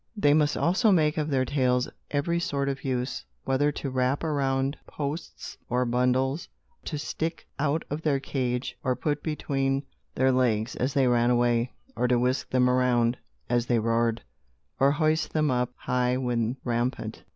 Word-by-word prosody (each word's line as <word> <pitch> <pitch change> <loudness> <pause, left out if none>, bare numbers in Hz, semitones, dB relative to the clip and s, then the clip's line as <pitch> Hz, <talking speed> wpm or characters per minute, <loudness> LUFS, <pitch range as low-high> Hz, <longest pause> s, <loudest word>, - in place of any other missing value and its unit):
They 145 -8 +4
must 150 -1 +2
also 195 +6 +3
make 155 -3 +3
of 155 0 -1
their 130 -2 +1
tails 125 -2 +1 0.2
every 170 +4 0
sort 140 -5 -1
of 135 -1 -4
use, 130 -1 -2 0.2
whether 140 +2 +2
to 140 -1 -4
wrap 130 +3 0
around 135 -2 0
posts 150 +3 -5
or 125 +1 +1
bundles, 125 +4 +1 0.4
to 150 - -3
stick 160 +2 -3
out 150 +2 0
of 150 +2 -4
their 145 -4 +1
cage, 125 -2 -2
or 130 -3 +1
put 145 +1 -1
between 135 -3 -1 0.3
their 130 0 +3
legs, 120 -3 +1
as 130 +3 -1
they 135 -2 +4
ran 120 -1 +3
away, 120 0 +2 0.2
or 125 - +1
to 125 0 +3
whisk 125 +2 0
them 125 -1 +3
around, 125 -1 +3 0.3
as 120 0 +1
they 120 - +3
roared; 115 0 +1 0.6
or 140 +1 +4
hoist 155 0 +1
them 155 -3 +2
up 125 -1 0
high 125 0 0
when 120 -1 -1
rampant. 120 +1 -2
130 Hz, 165 wpm, -27 LUFS, 125-145 Hz, 0.6 s, They